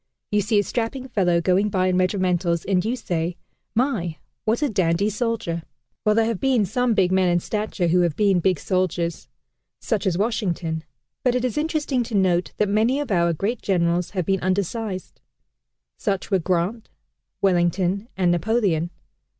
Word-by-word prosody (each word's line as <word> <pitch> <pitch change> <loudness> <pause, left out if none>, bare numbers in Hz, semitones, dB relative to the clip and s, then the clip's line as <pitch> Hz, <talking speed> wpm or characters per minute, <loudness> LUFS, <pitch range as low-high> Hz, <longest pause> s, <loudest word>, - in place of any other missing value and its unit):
You 210 0 +3
see 210 +2 +1
a 205 - +4
strapping 245 +4 -3
fellow 180 -7 +2
going 185 +5 +2
by 185 -2 +1
in 185 -1 +2
regimentals, 180 -2 +1
and 185 -2 +1
you 230 +4 0
say, 175 -6 -2 0.4
"My, 215 - 0 0.3
what 230 +6 +1
a 290 - +2
dandy 190 0 +1
soldier!" 210 -6 -2 0.4
Well, 210 0 +3
there 225 0 +3
have 225 -4 -1
been 255 -6 +2
some 240 +4 +1
big 185 -3 +3
men 185 -1 +3
in 175 0 +3
stature 210 -1 -2
who 175 +2 +3
have 170 -4 +1
been 200 -3 +3
big 180 0 +2
soldiers 175 -2 -1 0.5
such 215 -4 -1
as 175 -2 +1
Washington 180 -7 -1 0.4
but 250 -1 +2
it 250 0 +1
is 250 - -2
interesting 300 -4 0
to 235 -2 -4
note 185 -2 +2
that 210 - +2
many 220 +7 +2
of 290 -6 -3
our 170 -2 +3
great 200 +9 -2
generals 175 -2 +1
have 180 - +1
been 195 +1 +1
undersized. 190 +1 -2 0.8
Such 195 +1 -2
were 190 - +4
Grant, 185 +6 -1 0.5
Wellington, 185 +2 +1
and 180 -2 +3
Napoleon. 175 -3 +1
190 Hz, 170 wpm, -23 LUFS, 175-220 Hz, 0.8 s, a